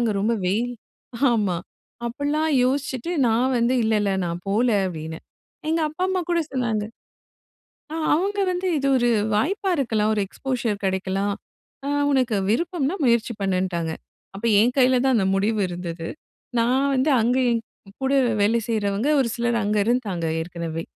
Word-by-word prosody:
அங்க 230 -3 +1
ரொம்ப 225 +3 +1
வெயில் 230 +6 0 0.6
ஆமா. 205 -6 +1 0.5
அப்படிலாம் 290 +6 -1
யோசிச்சுட்டு 275 +3 -1
நா 225 - +3 0.2
வந்து, 240 +2 +2
"இல்ல, 220 0 +1
இல்ல 205 -1 +1
நான் 170 +1 -4
போல" 225 +5 +2 0.2
அப்படின்னேன். 160 -2 -6 0.4
எங்க 325 +1 +1
அப்பா, 310 +4 -6
அம்மா 370 -1 0
கூட 340 -1 +2
சொன்னாங்க 230 -5 0 1.1
ஆ - - -2 0.2
அவங்க 395 +5 0
வந்து 365 +1 -2
இது 275 -1 0
ஒரு 240 -1 +2 0.3
வாய்ப்பா 380 - 0
இருக்கலாம். 220 -6 +1
ஒரு 210 - 0
எக்ஸ்போஷர் 240 -2 -2
கிடைக்கலாம். 190 +1 -1 0.5
அ - - -1 0.2
உனக்கு 255 -6 +2
விருப்பம்னா 335 - 0
முயற்சி 235 -1 +2
பண்ணுன்ட்டாங்க. 185 -4 -1 0.4
அப்ப 205 - -9 0.2
என் 240 +3 +3
கையில 255 -1 +4
தான் 265 -1 +3
அந்த 195 -4 +2
முடிவு 210 +2 +1
இருந்தது. 170 -2 -5 0.5
நா 230 - +3 0.3
வந்து 265 +3 +2
அங்க 245 +3 +2
என் 230 -1 +1 0.4
கூட 265 - +1 0.3
வேலை 225 +3 +3
செய்றவங்க, 210 +3 0
ஒரு 250 - +1
சிலர் 235 0 0
அங்க 210 +1 0
இருந்தாங்க 215 -8 0 0.2
ஏற்கனவே. 165 -1 -5
230 Hz, 150 wpm, -23 LUFS, 195-265 Hz, 1.1 s, கையில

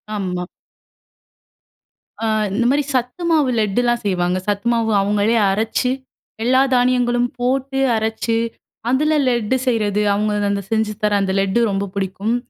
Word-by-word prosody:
ஆம்மா. 180 -3 -3 1.8
அ - - +1 0.3
இந்த 235 +4 0
மாதிரி 285 +2 +2
சத்து 255 +7 -2
மாவு 305 -5 +3
லெட்டுலாம் 240 +3 +1
செய்வாங்க. 180 -2 0
சத்துமாவு 225 +2 0
அவங்களே 205 +3 +1
அரைச்சு 225 +5 0 0.5
எல்லா 260 +2 +4
தானியங்களும் 245 -1 +2
போட்டு 265 +2 -1 0.2
அரச்சு 220 +1 -1 0.5
அதுல 300 +5 +2
லெட்டு 240 -1 +1
செய்றது. 210 -4 +1
அவங்க 210 +1 0 0.2
அந்த 200 0 -1
செஞ்சு 220 -1 0
தர 210 - +2
அந்த 190 -1 0
லெட்டு 195 +4 +1
ரொம்ப 195 0 -1
புடிக்கும். 195 +3 -1
225 Hz, 125 wpm, -19 LUFS, 200-245 Hz, 1.8 s, எல்லா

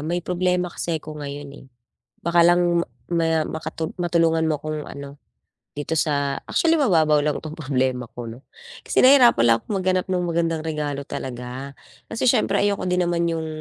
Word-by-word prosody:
may 170 +3 -3
problema 180 0 0
kasi 170 -1 -2
ako 155 -1 -8
ngayon 145 0 -6
eh, - - -15 0.6
baka 170 0 +3
lang 175 0 +3 0.3
ma 165 -2 +1
makatu 160 0 -4
matulungan 165 -2 +2
mo 155 - +1
akong 155 -1 -4
ano 140 0 -9 0.6
dito 145 +2 -4
sa 145 -3 0
actually 330 -1 +2
mababaw 160 - +3
lang 150 0 0
itong 155 -1 -7
problema 130 -4 -1
ko 120 - -8
'no. 115 +3 -10 0.4
Kasi - - +2
nahirap 260 -2 +7
pala 115 0 +4
akong - - -6
maghanap 185 -1 0
ng 180 -1 0
magandang 165 -2 -1
regalo 145 -3 -3
talaga, 130 +2 -6 0.4
kasi 225 - -2
siyempre 225 -5 +3
ayoko 200 -1 0
din 180 0 +1
naman 170 0 0
'yong 165 -1 -3
160 Hz, 170 wpm, -23 LUFS, 145-175 Hz, 0.6 s, nahirap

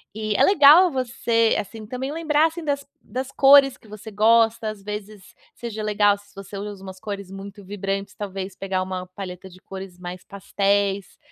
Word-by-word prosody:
E 215 -1 -2
é - - +4
legal 345 0 +7
você 235 -3 +1
assim 215 +1 -7
também 260 +4 -4
lembrar 315 -1 +2
assim 325 +1 -7
das 280 -1 -1 0.2
das 260 +2 -5
cores 275 -1 +6
que 220 - -21
você 215 +1 -10
gosta, 225 +1 +3
as 210 -2 -9
vezes 210 -1 -8 0.2
seja 220 -2 -6
legal, 205 -1 +3
se 205 0 -22
você 195 0 -9
usa 200 -1 -7
umas 190 -1 -9
cores 200 -3 -6
muito 200 +1 -9
vibrantes, 195 0 -4
talvez 195 -1 -6
pegar 190 -1 -2
uma 185 -1 -5
paleta 190 -1 -8
de 185 +1 -17
cores 190 -2 -9
mais 180 0 -8
pastéis. 200 0 -1
205 Hz, 175 wpm, -23 LUFS, 195-235 Hz, 0.2 s, legal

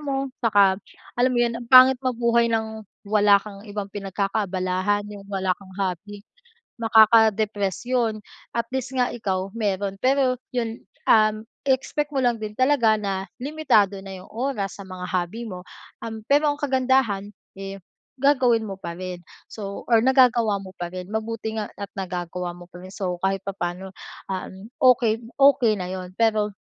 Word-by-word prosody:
mo 275 -2 -3
saka 200 -4 +4 0.4
alam 255 +1 +4
mo - - +3
yun, 235 - -1
ang 235 - -10
pangit 255 0 +8
mabuhay 235 -2 +2
ng 220 -1 -2 0.2
wala 205 -1 +5
kang 200 -2 -10
ibang 205 -1 -5
pinagkakaabalahan, 195 0 -1
yung 200 -1 -10
wala 190 -2 0
kang 195 -2 -16
hobby, 200 +2 -4 0.6
makaka-depress 220 -3 +4
yun. 230 -4 -1 0.3
At 230 -1 -1
least 265 0 -3
nga 250 -1 +1
ikaw 190 -4 -3
meron, 200 -3 -2
pero 260 -1 +2 0.2
yun, 230 -2 -2 0.3
um, 215 0 +4 0.2
i-expect 285 +2 0
mo 265 - +1
lang 240 -2 +1
din 210 -1 -6
talaga 255 -5 +3
na 195 -2 -3
limitado 235 -10 +2
na 195 0 -8
yung - - -17
oras 220 -5 -3
sa 195 - -9
mga 185 -1 -8
hobby 185 +6 -2
mo. 180 -3 -7 0.4
Um, 220 -1 -6
pero 290 +2 +4
ang - - -3
kagandahan, 260 -7 +1 0.3
eh, 195 0 -6 0.4
gagawin 255 -5 +3
mo 195 -2 -7
pa 170 -2 -6
rin. 180 -1 -6 0.3
So 200 -2 -6
or 225 - +7
nagagawa 245 -5 +4
mo 185 - -10
pa 175 - -3
rin. 185 +2 -8
Mabuti 220 0 -3
nga 210 - -3
at 200 -1 -7
nagagawa 180 -1 -4
mo 175 - -12
pa 175 - -11
rin 185 +1 -11
so, 180 -3 -3
kahit 195 0 0
papaano, 190 -1 -4 0.4
um, 190 +3 -6
okey 235 -3 +4 0.2
okey 275 -6 +5
na 180 -3 -5
yun. 185 -1 -6
Pero 215 -2 +1
210 Hz, 160 wpm, -24 LUFS, 195-240 Hz, 0.6 s, pangit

